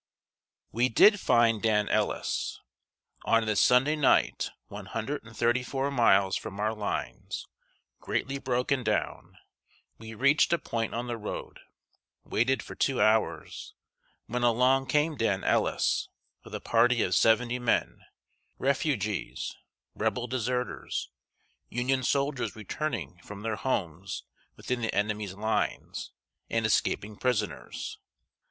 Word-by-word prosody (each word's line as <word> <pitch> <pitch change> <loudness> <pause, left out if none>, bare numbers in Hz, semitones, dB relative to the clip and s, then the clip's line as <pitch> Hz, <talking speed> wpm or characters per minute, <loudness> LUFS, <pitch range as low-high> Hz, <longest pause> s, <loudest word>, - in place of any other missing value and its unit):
] - - -65 0.3
We 120 +3 +2
did 205 - +6
find 115 - +3
Dan 105 -2 +2
Ellis. - - -1 0.6
On 115 0 +3
this 110 -2 +1
Sunday 135 +5 +4
night, 150 -3 +2 0.2
one 100 -1 -8
hundred 115 +8 -3
and 115 0 -14
thirty 120 +2 +2
four 135 +2 -2
miles 100 -7 +4
from 105 -2 -5
our 110 +1 +1
lines, 105 -2 -4 0.5
greatly 135 0 -2
broken 125 0 0
down, 105 -2 -2 0.6
we 110 0 -9
reached 140 +8 +4
a - - +4
point 115 -8 -3
on 120 +1 -2
the 120 -1 -4
road, 105 - -6 0.6
waited 130 +4 +1
for - - -9
two 135 -2 0
hours, 110 0 +1 0.5
when 125 +1 -3
along 125 +3 +3
came 150 +1 +1
Dan 100 -4 0
Ellis, - - +1 0.3
with - - -8
a - - -3
party 120 +1 +3
of 90 - 0
seventy 120 +4 +3
men 120 -1 0 0.6
refugees, 130 - -1 0.4
Rebel 125 -1 -1
deserters, 125 0 -3 0.6
Union 130 +2 0
soldiers 140 0 0
returning 110 - -4
from 100 -1 -9
their 110 -1 -1
homes 95 -6 -3 0.3
within 125 -1 -3
the 115 - -1
enemy's 105 -1 -1
lines, 110 +2 -2 0.4
and 115 -1 0
escaping 105 -1 0
prisoners. 110 -6 -2
115 Hz, 125 wpm, -28 LUFS, 105-130 Hz, 0.6 s, did